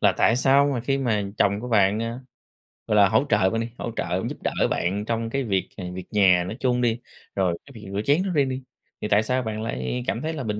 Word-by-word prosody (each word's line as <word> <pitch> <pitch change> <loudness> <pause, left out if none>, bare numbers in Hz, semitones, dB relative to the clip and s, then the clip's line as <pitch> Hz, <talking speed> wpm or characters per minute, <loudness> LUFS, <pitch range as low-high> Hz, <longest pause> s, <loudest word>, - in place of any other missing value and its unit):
là - - +4
tại 115 +2 +4
sao 135 +2 +4
mà 120 - -1
khi 135 +3 0
mà 115 -6 0 0.2
chồng 100 +1 +2
của 125 - -6
bạn, 105 -2 +3
ờ, 115 +2 -4 0.7
gọi 105 - +1
là, 100 -2 +6
hỗ 110 +7 +3
trợ 105 -4 +3
bạn 115 +2 -1
đi, 115 - -4
hỗ 120 - -4
trợ - - -2
giúp - - -7
đỡ - - 0 0.2
bạn 100 +4 -1
trong 115 0 -2
cái 140 +2 -1
việc, 95 -5 -1
à, 95 - -6
việc 90 -1 -7
nhà 95 -4 +4
nói 105 +6 -6
chung 125 -1 +1
đi, 120 0 +1 0.4
rồi 90 -3 +1
cái 140 - -14
việc 105 -3 -10
rửa 100 - -1
chén 150 +6 +3
nói 190 - -2
riêng 140 -2 +3
đi, 130 +1 -4 0.4
thì - - -2
tại 105 +1 +3
sao 125 +2 0
bạn 110 -1 -4
lại, 65 - -3
à, 125 - -3
cảm 115 - -1
thấy 160 +2 -2
là 140 -5 -4
bình 105 -1 -3
115 Hz, 270 wpm, -24 LUFS, 100-125 Hz, 0.7 s, là